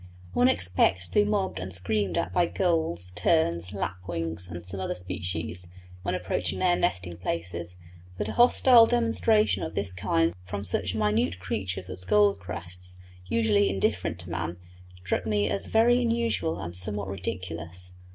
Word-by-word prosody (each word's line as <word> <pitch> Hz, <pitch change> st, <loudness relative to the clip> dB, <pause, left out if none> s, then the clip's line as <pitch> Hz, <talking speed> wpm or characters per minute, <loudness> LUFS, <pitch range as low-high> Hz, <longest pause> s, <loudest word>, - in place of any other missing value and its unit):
One 125 Hz, +4 st, +4 dB
expects 90 Hz, -2 st, +2 dB
to -, -, -16 dB
be 210 Hz, -, +5 dB
mobbed 205 Hz, -2 st, -1 dB
and 90 Hz, +1 st, -5 dB
screamed 95 Hz, +1 st, -1 dB
at 85 Hz, +2 st, -1 dB
by 170 Hz, -, +3 dB
gulls, 160 Hz, -, 0 dB
terns, 90 Hz, -, +1 dB
lapwings, 90 Hz, -3 st, -4 dB
and 85 Hz, 0 st, -8 dB
some 95 Hz, +1 st, -3 dB
other 95 Hz, -, -2 dB
species, 90 Hz, -1 st, -2 dB, 0.3 s
when -, -, -1 dB
approaching -, -, -2 dB
their 180 Hz, -1 st, +3 dB
nesting 90 Hz, -, -1 dB
places, 85 Hz, 0 st, -4 dB, 0.4 s
but 105 Hz, -, -2 dB
a -, -, -2 dB
hostile 240 Hz, -, +6 dB
demonstration 230 Hz, -2 st, +2 dB
of 160 Hz, -, -5 dB
this 100 Hz, -2 st, 0 dB
kind 85 Hz, -2 st, +1 dB
from 100 Hz, +2 st, -5 dB
such 95 Hz, -1 st, 0 dB
minute 105 Hz, -4 st, +1 dB
creatures 95 Hz, 0 st, -3 dB
as 90 Hz, 0 st, -4 dB
gold 100 Hz, +1 st, +3 dB
crests, 90 Hz, 0 st, -6 dB, 0.3 s
usually 105 Hz, -2 st, +3 dB
indifferent 90 Hz, -3 st, 0 dB
to 85 Hz, 0 st, -9 dB
man, 85 Hz, 0 st, -3 dB, 0.5 s
struck 90 Hz, -, -1 dB
me 105 Hz, -1 st, +1 dB
as 100 Hz, 0 st, 0 dB
very 240 Hz, +2 st, +4 dB
unusual 230 Hz, -8 st, 0 dB
and 85 Hz, +1 st, -6 dB
somewhat 100 Hz, +2 st, -2 dB
ridiculous. 90 Hz, -2 st, -5 dB
95 Hz, 155 wpm, -27 LUFS, 90-110 Hz, 0.5 s, hostile